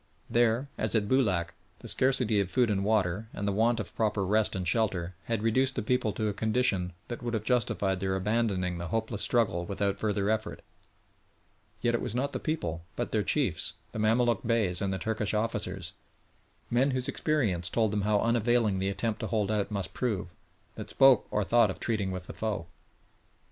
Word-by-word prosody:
There, 120 +3 +2
as 110 -1 0
at 105 -2 +2
Boulac, 100 -10 +1 0.2
the - - -11
scarcity 125 -5 +4
of 100 -2 0
food 125 -1 +2
and 100 -1 0
water, 105 -1 +1
and 100 - -3
the - - +2
want 115 +3 +2
of 110 - -6
proper 105 -3 0
rest 105 +1 +1
and 90 -2 -3
shelter, 95 -4 0
had 115 -2 -2
reduced 130 +4 +2
the - - -2
people 125 -1 +1
to 110 - -1
a 105 - -1
condition 105 -4 0
that 120 - -6
would 120 -1 -2
have 110 - -2
justified 105 -5 0
their 95 0 -1
abandoning 95 -3 0
the 85 - -4
hopeless 110 +2 -2
struggle 105 -6 +2
without 100 +1 -2
further 100 -2 0
effort; 110 0 -3 1.2
yet 120 -1 +1
it 120 - 0
was 110 - -3
not 140 +3 -1
the - - -2
people, 150 - -3
but - - -3
their - - +1
chiefs - - 0 0.2
the - - -5
Mamaluk 115 +1 +2
Beys 110 -6 +1
and 100 -1 0
the 95 - -1
Turkish 110 0 -2
officers 100 -4 -2 0.8
men 125 +4 +3
whose 130 -2 -1
experience 105 - 0
told 110 -3 +1
them 105 -1 0
how 105 0 +2
unavailing 115 -3 +2
the 95 +1 0
attempt 105 +3 -2
to - - -3
hold 105 -2 0
out 105 -2 0
must 100 -3 -4
prove, 100 -8 -2 0.4
that - - -8
spoke 135 -4 +5
or 105 - 0
thought 120 +4 +4
of - - -5
treating 105 -5 -1
with 90 -1 -5
the - - -8
foe. 105 -6 -3
110 Hz, 195 wpm, -29 LUFS, 95-115 Hz, 1.2 s, spoke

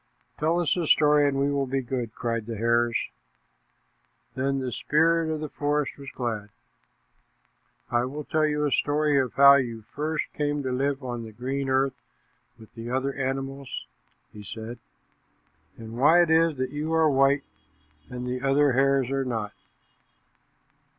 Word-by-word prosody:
"Tell 160 +3 +1
us 170 -4 +1
a 170 -3 -2
story 150 -1 +5
and 140 -1 0
we 140 +1 +1
will 140 -1 0
be 135 +1 -1
good," 120 -2 -4
cried 115 -2 -3
the 115 -2 -5
hares. 115 +1 +2 1.4
Then 135 +1 -1
the 130 -2 -3
spirit 160 +5 +2
of 155 -1 -3
the 155 - -3
forest 145 0 -1
was 140 -1 -8
glad. 110 -6 -4 1.4
"I 120 +1 +2
will 145 +4 -5
tell 155 +1 +1
you 150 0 0
a 145 - 0
story 145 0 +2
of 130 -2 -1
how 140 0 +8
you 115 -4 -3
first 150 +6 -3
came 145 -1 -1
to 130 - -2
live 135 +2 -1
on 120 -2 -4
the 110 - -9
green 135 +5 -3
earth 130 -1 0 0.6
with 110 -2 -16
the 115 0 -7
other 135 +2 -1
animals," 135 0 -4 0.5
he 105 - -10
said, 110 +3 -8 1.0
"and 115 0 -9
why 165 +6 +6
it 165 - -1
is 160 -2 +3
that 130 0 -2
you 150 +2 -3
are 160 -1 +4
white, 140 0 +3 0.7
and 125 0 -6
the 125 0 -3
other 140 +1 +3
hares 135 0 +2
are 135 0 0
not." 110 -5 -3
135 Hz, 165 wpm, -26 LUFS, 125-145 Hz, 1.4 s, how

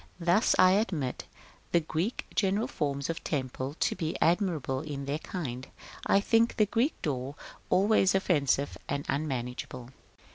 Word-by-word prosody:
Thus, 175 +6 +3
while 185 - +7
I - - +4
admit 155 - -2 0.5
the 170 - +6
Greek 165 +7 -2
general 200 +3 +1
forms 140 - -2
of 165 - -4
temple 130 -1 -3
to - - +2
be 165 -3 -2
admirable 165 -7 +1
in 140 -2 -5
their 145 +2 -2
kind, 135 -9 -5 0.4
I 195 - +5
think 225 +3 +3
the 215 - +4
Greek 240 +8 0
door 135 -2 -2 0.3
always 195 +1 +4
offensive 145 -7 +1
and 140 0 -2
unmanageable. 125 -3 -3
155 Hz, 145 wpm, -29 LUFS, 140-195 Hz, 0.5 s, while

